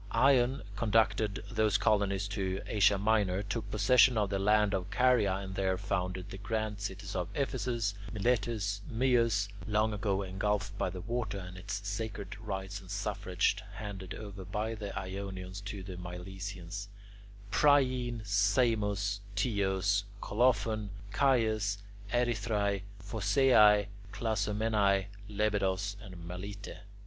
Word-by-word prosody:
Ion 135 -1 +3
conducted 105 -2 +2
those 110 -2 +3
colonies 100 -2 +2
to 95 -2 -2
Asia 100 -1 +4
Minor, 100 -2 +2
took 100 +1 -4
possession 115 +4 +5
of 105 -2 +1
the 100 - 0
land 105 +1 +3
of 95 -1 -2
Caria, 120 -7 +3
and 95 -1 -5
there 95 -1 0
founded 90 0 -3
the 95 - -7
grand 110 0 -2
cities 100 0 -5
of 90 -1 -2
Ephesus, 120 -6 -1 0.2
Miletus, 110 -2 0
Myus 115 -4 +2 0.2
(long 105 +1 +2
ago 100 -1 0
engulfed 100 +1 -1
by 95 - -1
the 90 0 -6
water, 110 -1 -2
and 90 -1 -8
its 100 +2 -5
sacred 105 -1 -4
rites 100 -2 -5
and 95 - -14
suffrage 100 -2 0 0.2
handed 95 -3 -6
over 100 -3 -8
by 105 +4 -2
the 105 -3 -5
Ionians 95 0 -5
to 100 -1 -5
the 90 -1 -7
Milesians), 90 +2 -6 0.6
Priene, 125 -2 +3
Samos, 100 -1 +2 0.2
Teos, 100 -2 +1
Colophon, 110 -2 +1 0.2
Chius, 110 -6 +2 0.3
Erythrae, 115 -5 +1 0.2
Phocaea, 105 0 +5 0.3
Clazomenae, 105 -2 +1 0.2
Lebedos, 100 -1 0
and 90 -4 -10
Melite. 100 +3 -7
100 Hz, 120 wpm, -32 LUFS, 95-110 Hz, 0.6 s, possession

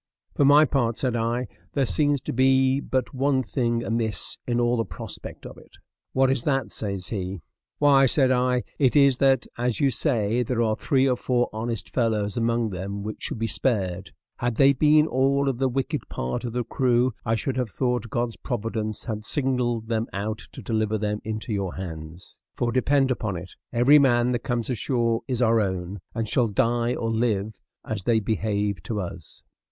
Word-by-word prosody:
For 140 - +2
my 145 +2 +7
part," 120 -5 0
said 125 -3 -1
I, 120 +2 -1 0.3
"there 140 -2 +2
seems 145 +1 +1
to - - -4
be 130 +1 +3
but 130 -1 -2
one 135 0 +1
thing 120 -1 -1
amiss 115 -2 -2
in 120 -1 +1
all 120 0 +2
the 115 - +1
prospect - - -7
of - - -10
it." - - -19 0.3
"What 135 0 +3
is 130 -3 -1
that?" 135 -5 0
says 100 -4 -4
he. 95 -4 -4 0.3
"Why," 140 -2 +5
said 130 0 +3
I, 125 0 +2 0.2
"it 135 -2 +3
is 140 -3 +5
that, 135 -2 +3
as 120 -1 0
you 140 -3 +3
say, 120 -5 +1
there 120 0 0
are 110 -1 +1
three 135 +4 +2
or 125 - +2
four 125 0 0
honest 115 0 -3
fellows 110 -4 0
among 115 -1 0
them 100 +2 -5
which 110 +1 -6
should - - -3
be 115 - -1
spared; 95 - -1 0.3
had 120 -1 -1
they 140 +3 +5
been 150 +2 +4
all 140 0 +1
of 130 -3 -1
the 135 -1 +2
wicked 130 +1 -3
part 65 - -3
of 120 - -4
the 125 0 -1
crew 125 0 +1
I 115 -1 +1
should 130 +4 -2
have 125 -3 -1
thought 125 +1 -1
God's 120 0 -2
providence 110 -3 -3
had 110 -3 -4
singled 125 -3 0
them 115 0 -1
out 105 +2 -3
to - - -9
deliver 110 -1 0
them 105 0 -2
into 110 +1 -4
your 95 -3 -2
hands; 80 -2 -8 0.2
for 120 -1 0
depend 135 +2 +2
upon 105 -7 -2
it, 90 +1 -9 0.2
every 130 +5 +6
man 125 -3 +3
that 120 - 0
comes 120 -1 -2
ashore 115 -1 0
is 125 -2 0
our 115 -1 +4
own, 95 0 -3 0.2
and 115 -1 -2
shall 120 +2 +2
die 120 +2 +1
or 115 0 -2
live 110 -2 0 0.3
as 110 -4 -4
they 115 -2 +3
behave 105 -2 -1
to 105 +4 -3
us." 85 -4 -8
120 Hz, 190 wpm, -25 LUFS, 110-130 Hz, 0.3 s, my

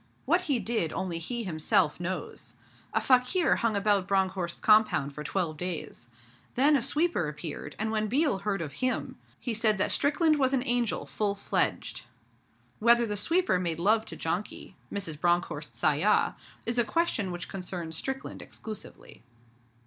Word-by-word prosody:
What 355 -1 +2
he 275 - +3
did 220 -9 -1
only 180 -3 -2
he 235 +8 -3
himself 155 -4 +1
knows. 180 +1 -4 0.4
A - - +2
fakir 260 +8 +3
hung 230 -3 0
about 200 -2 +2
Bronckhorst's 190 -3 0
compound 210 -10 +4
for 150 - -6
twelve 160 -1 -2
days. 165 -8 -3 0.5
Then 285 +4 +5
a 275 - +2
sweeper 295 - +1
appeared, 150 -1 -6
and 220 +1 -1
when 215 -1 0
Biel 265 -2 +2
heard 195 -3 -1
of 145 -3 -7
him, 255 0 -1 0.2
he 240 - -2
said 220 -1 +2
that 200 - +1
Strickland 310 +1 +3
was 265 -1 +2
an 255 0 -1
angel 240 -3 0
full 205 -2 -1
fledged. 200 - -1 0.7
Whether 235 +1 +5
the 210 -2 -3
sweeper 330 - +2
made 170 -3 -1
love 215 +6 +2
to - - -7
Janki, 180 +4 -4 0.2
Mrs. 165 -7 -4
Bronckhorst's 175 +1 -1
ayah, - - +3 0.3
is 235 +1 0
a - - +5
question 225 - 0
which 175 0 -5
concerns 180 -3 -5
Strickland 265 +9 -5
exclusively. 215 -2 -9
205 Hz, 155 wpm, -28 LUFS, 175-245 Hz, 0.7 s, Then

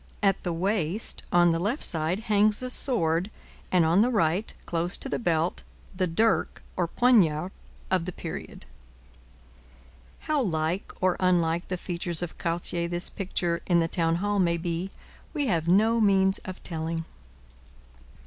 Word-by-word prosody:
At 195 -1 +2
the 175 - -2
waist, 185 +2 -1
on 175 -1 +5
the 165 - 0
left 215 - +1
side, 165 +4 +3
hangs 210 +1 +2
a 255 - -4
sword, 180 - 0 0.4
and, 180 -3 +4
on 170 +5 +4
the 240 - +3
right, 195 -2 +1
close 170 +2 -1
to - - -7
the - - -2
belt, 170 -4 0 0.3
the 185 0 0
dirk 220 +7 +1
or 175 - 0
poniard 185 -7 +3 0.4
of 185 -3 +1
the 180 - -4
period. 170 -2 -7 1.6
How 305 -2 0
like 165 -3 -1
or 185 -1 +2
unlike 175 -2 +1
the 185 - -3
features 175 -1 -3
of 175 - -7
Cartier 170 0 -1
this 175 +1 0
picture 175 -3 -2
in 175 -2 +4
the 165 - +1
town 165 -1 +1
hall 205 +3 0
may 170 -2 +2
be, 170 +2 -3 0.5
we 290 -2 0
have 170 -8 0
no 220 +6 +4
means 190 -2 +3
of 185 -2 -8
telling. 165 0 -3
175 Hz, 155 wpm, -27 LUFS, 165-200 Hz, 1.6 s, on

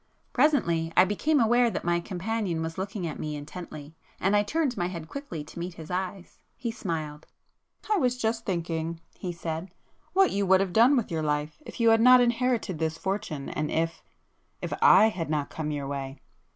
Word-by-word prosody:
Presently 170 - +2
I - - +8
became 290 +10 +1
aware 240 +1 +4
that - - -4
my 175 0 +1
companion 185 -1 -2
was 165 +2 -5
looking 195 -1 -3
at 155 - -5
me 150 -1 -3
intently, 150 0 -8 0.3
and 195 +3 +2
I 205 - +5
turned 280 +4 0
my 175 - -1
head 170 -3 -6
quickly 180 - -6
to 155 - -10
meet 175 0 -5
his 160 +1 -9
eyes. 185 0 -4 0.2
He 240 -2 -3
smiled. 155 -8 -5 0.6
"I 425 - +2
was 250 -7 +1
just 225 -1 -1
then 175 -4 0
thinking," 165 0 -3 0.2
he 180 - -3
said, 165 +1 -5 0.4
"what 385 0 +4
you 200 -1 0
would 190 0 +6
have 190 -2 -1
done 245 +5 +6
with 230 -6 -1
your 160 -1 -1
life 150 - -2
if - - -9
you 230 -1 +5
had 225 0 +4
not 250 +1 +8
inherited 240 -7 +1
this 160 0 -1
fortune, 190 -7 -3
and 155 0 -2
if,—if 165 +1 -5
I 220 - +7
had 170 -7 -4
not 150 -2 -1
come 155 -1 -3
your 145 -2 -3
way?" 135 0 -5
180 Hz, 195 wpm, -27 LUFS, 160-225 Hz, 0.6 s, I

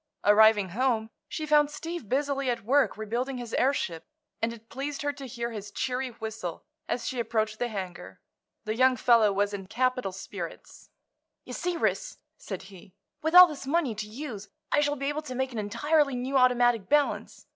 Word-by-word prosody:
Arriving 210 -1 +6
home 225 +1 0 0.2
she 310 - -4
found 295 -1 +4
Steve 325 - -6
busily 275 0 0
at 240 - -2
work 260 -4 +3
rebuilding 240 +5 -3
his 240 -2 -7
airship, 250 - 0 0.4
and 225 - +1
it 225 -1 -12
pleased 280 +3 -5
her 290 0 0
to 275 -2 -8
hear 235 -1 -4
his 210 -2 -7
cheery 255 0 -2
whistle 220 -7 -6 0.3
as 235 -1 -2
she 255 - -3
approached 220 -2 -1
the 245 - 0
hangar. 190 -6 -7 0.5
The 215 - -1
young 255 +1 +4
fellow 230 -3 +5
was 205 +1 0
in 195 -2 -6
capital 250 -1 0
spirits. 185 -2 -8 0.6
"You - - -8
see, 355 -1 -2
Ris," - - -1 0.2
said 190 -2 -6
he, 190 -1 -15 0.3
"with 320 +2 0
all 360 0 +13
this 300 -5 -7
money 290 -5 +1
to 215 0 -5
use 215 -3 -7 0.2
I - - +4
shall 290 0 +1
be 275 -1 -4
able 290 +2 -1
to 255 -5 -7
make 265 +1 -1
an 230 - -4
entirely 275 +7 +1
new 255 +3 -3
automatic 245 -4 +3
balance. 295 0 0
245 Hz, 185 wpm, -28 LUFS, 215-275 Hz, 0.6 s, all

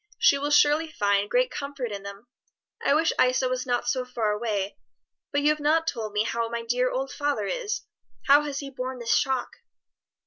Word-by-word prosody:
she - - +5
will 290 +1 -1
surely 295 +2 +4
find 200 -7 +1
great - - +2
comfort 280 -4 -5
in 200 -1 -5
them. 200 +2 -9 0.6
I 280 - +3
wish 320 +1 +2
Isa 255 +1 +2
was 255 0 -2
not 245 -1 0
so 255 - 0
far 235 -4 -1
away. 210 - -2 0.5
But 285 0 0
you 295 - +5
have 305 0 +1
not 315 +2 +2
told 225 -9 -3
me 210 +1 +1
how 230 0 -2
my 235 0 -4
dear 250 +2 +1
old 270 +2 -3
father 290 -8 -1
is. 435 - -2 0.4
How 285 +1 +7
has 290 -1 -4
he 275 -1 -7
borne 260 0 -5
this 235 -1 +1
shock?" 265 -2 -1
255 Hz, 200 wpm, -26 LUFS, 230-290 Hz, 0.6 s, How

